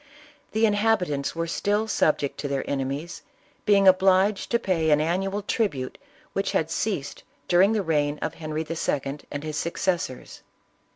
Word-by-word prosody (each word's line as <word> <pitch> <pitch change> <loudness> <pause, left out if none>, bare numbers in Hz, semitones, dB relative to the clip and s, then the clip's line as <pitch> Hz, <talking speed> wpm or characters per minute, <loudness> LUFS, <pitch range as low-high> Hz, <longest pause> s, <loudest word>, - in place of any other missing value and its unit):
The 220 +1 +3
inhabitants 205 -10 +1
were 165 0 -1
still 205 +6 0
subject 150 -8 +1
to 145 - -2
their 140 -1 -2
ene 135 -1 -1
mies, 150 +6 -5 0.5
being 200 -2 +5
obliged 190 +2 +4
to 235 - +3
pay 175 -8 0
an 150 -1 +5
annual 190 +6 -1
tribute 145 - -2 0.3
which - - -1
had - - 0
ceased - - -2 0.3
during 190 +5 +5
the 210 -2 0
reign 150 -3 +1
of - - -3
Henry 155 0 -4
II. 145 -3 -2
and 145 0 -4
his 155 -1 -4
succes 175 +2 0
sors. 130 -6 -8
170 Hz, 160 wpm, -25 LUFS, 150-200 Hz, 0.5 s, being